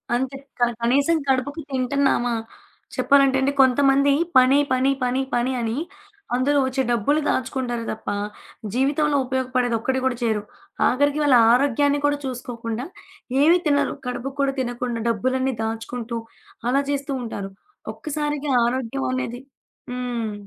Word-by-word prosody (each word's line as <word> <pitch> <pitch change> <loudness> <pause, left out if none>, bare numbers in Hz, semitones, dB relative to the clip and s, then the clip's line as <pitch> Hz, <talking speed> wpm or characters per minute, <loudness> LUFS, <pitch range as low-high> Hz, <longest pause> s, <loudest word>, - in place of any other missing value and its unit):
అంతే. 265 +2 -2 0.2
క - - -9 0.2
కనీసం 280 +7 +3
కడుపుకు 270 +4 0
తింటున్నామా 255 -2 +1 0.6
చెప్పాలంటే 275 -1 +4
అండి 270 +1 +2
కొంతమంది 275 +2 +4 0.2
పని, 255 +2 +6
పని, 260 +1 +3
పని, 250 +1 +1
పని 240 +2 +1
అని 230 +1 -2 0.6
అందులో 280 +3 +2
వచ్చే 260 +1 -1
డబ్బులు 240 +6 +2
దాచుకుంటారు 250 -2 -1
తప్ప, 220 - -6 0.6
జీవితంలో 285 +4 +1
ఉపయోగపడేది 255 -2 0
ఒక్కటి 260 +3 -1
కూడా 260 -1 +1
చేయరు. 220 -3 0 0.4
ఆఖరికి 285 +3 +2
వాళ్ళ 285 -3 +5 0.2
ఆరోగ్యాన్ని 285 +3 +3
కూడా 290 0 +2
చూసుకోకుండా, 245 -2 -5 0.6
ఏమి 330 +4 +6
తినరు 285 -2 +2
కడుపుకి 250 +2 -4
కూడా 275 -1 +1
తినకుండా 245 -2 -3
డబ్బులన్నీ 260 +4 0
దాచుకుంటూ 225 +1 -4 0.5
అలా 275 +3 +3
చేస్తూ 280 0 -2
ఉంటారు 200 -4 -5 0.4
ఒక్కసారిగా 295 -1 -3
ఆరోగ్యం 235 - -2
అనేది 130 - -3 0.5
హ్మ్. 245 -3 -3
260 Hz, 125 wpm, -23 LUFS, 240-280 Hz, 0.6 s, పని